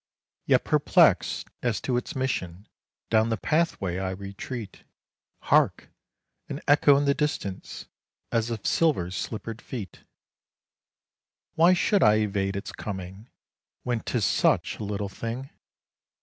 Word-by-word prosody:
Yet - - +4
perplexed - - +3
as 120 -3 0
to 125 - -1
its 125 +6 -3
mission 105 -8 -3 0.4
down 110 0 +3
the 115 - 0
pathway 100 - 0
I 95 -1 -2
retreat, 100 +3 -7 0.6
Hark! - - +2 0.6
an - - -4
echo 145 -1 +6
in 145 - +1
the 140 - +4
distance, 140 - -3 0.5
as 115 -1 0
of 115 -3 -5
silver 140 - +2
slippered 110 +4 -5
feet. 105 -9 -7 1.5
Why 170 +3 +5
should 195 +2 +2
I 105 0 +6
evade 100 -2 0
its 100 - -5
coming, 95 +2 -7 0.5
when 120 -2 -1
'tis 115 -2 -1
such - - +1
a - - -4
little 100 0 -3
thing? 115 +7 -6
110 Hz, 125 wpm, -26 LUFS, 100-130 Hz, 1.5 s, echo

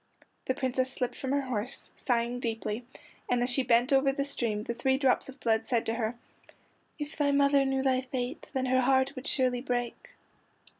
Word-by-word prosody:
The 260 - +1
Princess 260 -1 0
slipped 250 -2 -2
from 265 - -4
her 280 0 +2
horse, 250 -1 -4
sighing 240 0 0
deeply, 225 0 -3 0.4
and 245 -1 +2
as 250 - +1
she 270 - +3
bent 250 +2 +3
over 270 0 +4
the 280 +1 -1
stream 235 -7 0
the 235 - -3
three 265 +3 +1
drops 270 -1 +2
of 270 +1 -11
blood 225 -2 +1
said 235 -3 0
to 225 - 0
her: 230 0 -2 0.8
"If 295 -1 -6
thy 290 -1 +1
mother 280 0 +4
knew 270 0 0
thy 260 -1 +2
fate, 255 -1 -4
Then 265 -2 -1
her 260 0 +3
heart 265 +1 +3
would 255 +3 -6
surely 255 -2 +1
break." 245 -2 -3
255 Hz, 195 wpm, -29 LUFS, 240-270 Hz, 0.8 s, over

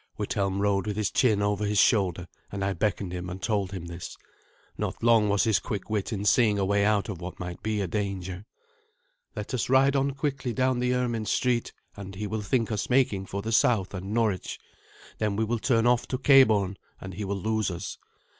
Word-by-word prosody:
Withelm 100 -1 -1
rode 100 0 +1
with 105 -1 -3
his 105 -2 0
chin 110 -5 +2
over 105 0 0
his 105 0 0
shoulder, 90 -5 +3 0.2
and 100 -1 -3
I 100 - 0
beckoned 100 -3 -1
him 90 0 -5
and 90 +1 -6
told 100 -3 -1
him 95 -4 -6
this. 85 +1 -8 0.6
Not - - -4
long 115 -3 +4
was 100 0 +2
his 110 -3 +3
quick 105 0 -5
wit 105 0 -1
in 100 -2 -3
seeing 105 -1 +4
a 100 - +1
way 100 +1 +2
out 105 -1 +2
of 95 -5 -6
what 90 +1 -7
might 90 -1 -6
be 110 -1 -1
a 95 - -1
danger. 95 -1 -4 0.9
"Let 105 +4 -5
us 125 - -1
ride 135 +1 +4
on 135 0 +1
quickly 135 -3 -2
down 130 0 +1
the 125 0 +1
Ermin 120 -4 -1
Street, 120 +2 0 0.2
and 100 -1 -8
he 105 +3 -4
will 110 +1 -3
think 115 +2 0
us 105 -2 -2
making 120 -7 +2
for 100 +1 -4
the 110 - -3
south 110 -4 +2
and 95 +1 -5
Norwich. 110 -4 0 0.6
Then 105 -2 0
we 110 - 0
will 115 +1 -1
turn 115 -1 +2
off 120 0 +3
to 130 - -2
Cabourn, 110 -8 +4 0.2
and 95 0 -8
he 105 - -5
will 100 0 -2
lose 110 +1 0
us. 90 +1 -6
105 Hz, 210 wpm, -27 LUFS, 95-115 Hz, 0.9 s, long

